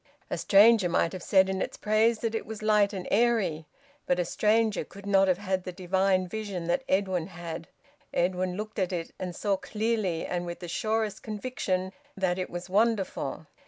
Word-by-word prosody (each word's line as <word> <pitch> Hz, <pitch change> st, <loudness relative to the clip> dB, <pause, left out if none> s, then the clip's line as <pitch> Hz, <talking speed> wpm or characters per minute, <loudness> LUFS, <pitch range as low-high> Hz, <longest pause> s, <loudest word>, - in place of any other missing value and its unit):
A -, -, -1 dB
stranger 210 Hz, -1 st, +6 dB
might 170 Hz, -1 st, +1 dB
have 185 Hz, -, -6 dB
said 190 Hz, +1 st, +4 dB
in 190 Hz, 0 st, -2 dB
its -, -, -3 dB
praise 215 Hz, +2 st, +2 dB
that 230 Hz, -1 st, -1 dB
it 225 Hz, -, -3 dB
was 220 Hz, -1 st, -7 dB
light 210 Hz, -2 st, +4 dB
and 185 Hz, -2 st, -5 dB
airy. 200 Hz, -9 st, +2 dB, 0.4 s
But 180 Hz, -, +2 dB
a 180 Hz, -, 0 dB
stranger 215 Hz, +2 st, +2 dB
could 200 Hz, +1 st, -13 dB
not 195 Hz, -1 st, +4 dB
have 185 Hz, -2 st, +3 dB
had 190 Hz, -2 st, -2 dB
the 185 Hz, -, -5 dB
divine 185 Hz, +1 st, +1 dB
vision 200 Hz, -3 st, -4 dB
that 175 Hz, +9 st, 0 dB
Edwin 190 Hz, -3 st, +1 dB
had. 170 Hz, -3 st, -7 dB, 0.4 s
Edwin 180 Hz, +1 st, 0 dB
looked 215 Hz, +1 st, -5 dB
at 185 Hz, -1 st, 0 dB
it 170 Hz, -2 st, -3 dB
and 180 Hz, -2 st, -4 dB
saw 200 Hz, -2 st, 0 dB
clearly, 210 Hz, -6 st, -1 dB
and 175 Hz, -1 st, -3 dB
with 170 Hz, -, -5 dB
the 175 Hz, -, -8 dB
surest 215 Hz, +3 st, -1 dB
conviction, 200 Hz, -4 st, -3 dB, 0.2 s
that 185 Hz, -1 st, 0 dB
it 185 Hz, -, -3 dB
was 175 Hz, 0 st, -6 dB
wonderful. 210 Hz, +1 st, 0 dB
190 Hz, 190 wpm, -28 LUFS, 180-215 Hz, 0.4 s, stranger